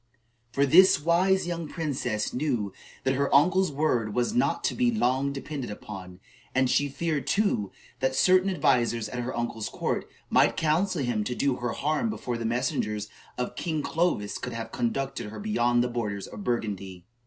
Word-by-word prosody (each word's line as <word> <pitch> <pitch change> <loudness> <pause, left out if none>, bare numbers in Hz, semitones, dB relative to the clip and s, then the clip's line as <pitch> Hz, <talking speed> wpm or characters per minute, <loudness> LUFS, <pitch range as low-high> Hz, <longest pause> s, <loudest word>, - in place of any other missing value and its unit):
For 140 +3 +2
this 180 +4 +7
wise 180 +5 +3
young 170 -2 -3
princess 135 - -2
knew 125 -8 -1 0.3
that 130 - +2
her 140 +1 0
uncle's 180 +5 +4
word 125 -8 0
was 125 - +1
not 245 - +1
to - - +1
be 250 -1 +2
long 140 - +1
depended 140 -1 -5
upon, 95 -3 -8 0.4
and 130 0 +4
she 145 0 +2
feared, 150 -1 -2
too, 200 - +1 0.3
that 130 0 0
certain 185 +4 +4
advisers 120 - +2
at 125 - -5
her 120 0 -4
uncle's 120 -2 -3
court - - -2 0.2
might - - +3
counsel 165 +1 +1
him 120 -4 0
to 125 - -2
do 135 -1 +1
her 120 -1 -2
harm 155 +10 0
before 125 - -3
the 115 - -3
messengers 110 -3 -1 0.3
of 125 0 -3
King 155 -4 -2
Clovis 165 -12 0
could 125 - -5
have 115 0 -5
conducted 125 -1 -2
her 110 - -8
beyond 120 - +2
the - - 0
borders 105 -5 -3
of 105 - -9
Burgundy. 100 -6 -3
130 Hz, 175 wpm, -27 LUFS, 115-160 Hz, 0.4 s, this